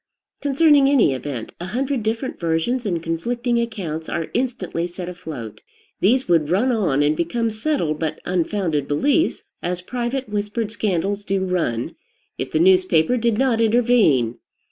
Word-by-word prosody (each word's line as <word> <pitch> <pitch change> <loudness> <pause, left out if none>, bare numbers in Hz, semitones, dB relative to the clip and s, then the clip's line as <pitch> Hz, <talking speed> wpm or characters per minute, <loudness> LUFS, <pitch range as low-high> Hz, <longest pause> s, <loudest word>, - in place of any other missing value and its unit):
Concerning 285 -1 +4
any 260 - +4
event, 130 -3 -5
a 175 - -5
hundred 260 +4 -1
different 225 +4 -3
versions 170 +9 0
and 170 -4 -2
conflicting 235 +9 -1
accounts 175 -9 -4
are 165 -2 -3
instantly 215 -9 -2
set 175 0 -7
afloat. 155 - -8 0.4
These 255 +7 +2
would 165 -4 +2
run 210 +9 +2
on, 175 - +1
and 150 +1 +2
become 225 +8 -1
settled 215 - -1
but 160 -1 -2
unfounded 175 -5 -1
beliefs, 290 - +1 0.2
as 175 0 -2
private 250 +6 -3
whispered 210 +1 -2
scandals 200 -1 -1
do 195 -1 -1
run, 165 -11 -1 0.4
if - - -3
the - - +1
newspaper 185 +2 +4
did 235 -2 +1
not 250 -3 +2
intervene. 220 - +3
195 Hz, 145 wpm, -21 LUFS, 165-240 Hz, 0.4 s, Concerning